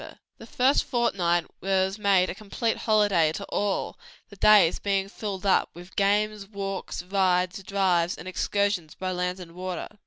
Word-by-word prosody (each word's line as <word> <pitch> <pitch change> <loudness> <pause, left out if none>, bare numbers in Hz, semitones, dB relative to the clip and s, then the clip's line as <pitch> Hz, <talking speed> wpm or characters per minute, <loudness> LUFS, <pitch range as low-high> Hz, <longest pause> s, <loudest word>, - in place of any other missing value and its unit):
The - - -11
first 260 +3 +2
fortnight 175 -9 +1 0.2
was 190 +1 0
made 195 -3 +3
a - - -5
complete 215 +3 -2
holiday 205 -8 +2
to 200 - -5
all, 205 -1 -2 0.3
the 200 - -13
days 200 -4 +5
being 195 -1 0
filled 200 -1 -6
up 195 - +3
with 175 +2 -13
games, 205 0 +1
walks, 195 -3 -5
rides, 185 0 +1
drives 190 -2 +1
and 165 - -9
excursions 200 -3 -1
by 185 0 -3
land 180 +1 -2
and 175 -2 -10
water. 180 0 -5
195 Hz, 155 wpm, -26 LUFS, 180-205 Hz, 0.3 s, days